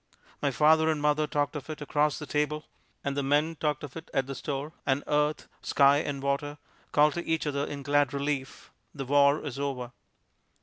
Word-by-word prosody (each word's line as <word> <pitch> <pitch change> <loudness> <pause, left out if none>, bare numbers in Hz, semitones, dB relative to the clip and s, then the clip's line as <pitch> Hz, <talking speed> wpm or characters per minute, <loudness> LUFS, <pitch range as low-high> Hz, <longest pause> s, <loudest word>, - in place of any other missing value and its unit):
My 145 - +2
father 160 +3 +4
and 155 -1 +1
mother 150 +1 +2
talked 145 0 -1
of 145 0 -6
it 155 - -5
across 150 0 +1
the 150 - -6
table, 150 +1 -1 0.4
and 140 0 -2
the 140 - 0
men 145 +4 +1
talked 150 -1 -1
of 140 -3 -8
it 165 - -8
at 135 - +2
the 135 - -5
store, 145 +2 -4
and 135 +1 +1
earth, 150 +1 0
sky 140 0 +4
and 145 -2 -3
water 145 +1 -1 0.3
called 150 0 +4
to 175 - -3
each 160 -1 -1
other 140 -1 -1
in 140 -1 -6
glad 145 -1 +2
relief, 140 -1 -3 0.2
"The 135 -2 -4
war 140 +2 +4
is 140 -2 -5
over!" 130 -4 -3
145 Hz, 200 wpm, -28 LUFS, 140-150 Hz, 0.4 s, father